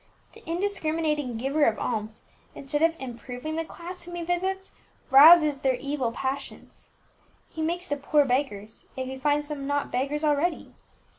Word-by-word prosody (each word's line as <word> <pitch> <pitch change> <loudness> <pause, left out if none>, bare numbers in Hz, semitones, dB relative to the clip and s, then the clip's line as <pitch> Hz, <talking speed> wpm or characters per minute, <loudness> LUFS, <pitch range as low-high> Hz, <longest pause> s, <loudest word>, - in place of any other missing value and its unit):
The - - -16
indiscriminating 315 - -1
giver 275 +6 0
of 220 - +2
alms, 220 -2 -4 0.3
instead 290 +2 -3
of 330 0 +3
improving 250 +4 -6
the 325 - -1
class 350 +3 -9
whom 350 0 -9
he 345 - -4
visits, 375 +3 -2 0.4
rouses 300 +1 +8
their 265 -1 +1
evil 275 -2 -2
passions. 270 +3 -6 0.6
He 320 - -6
makes 345 +3 -1
the 290 - -2
poor 290 +1 +2
beggars, 245 -5 -2
if 260 - -2
he 265 +1 -7
finds 295 +1 +1
them 285 -2 -5
not 285 0 -1
beggars 280 +4 -1
already. 305 +3 0
290 Hz, 155 wpm, -26 LUFS, 265-325 Hz, 0.6 s, rouses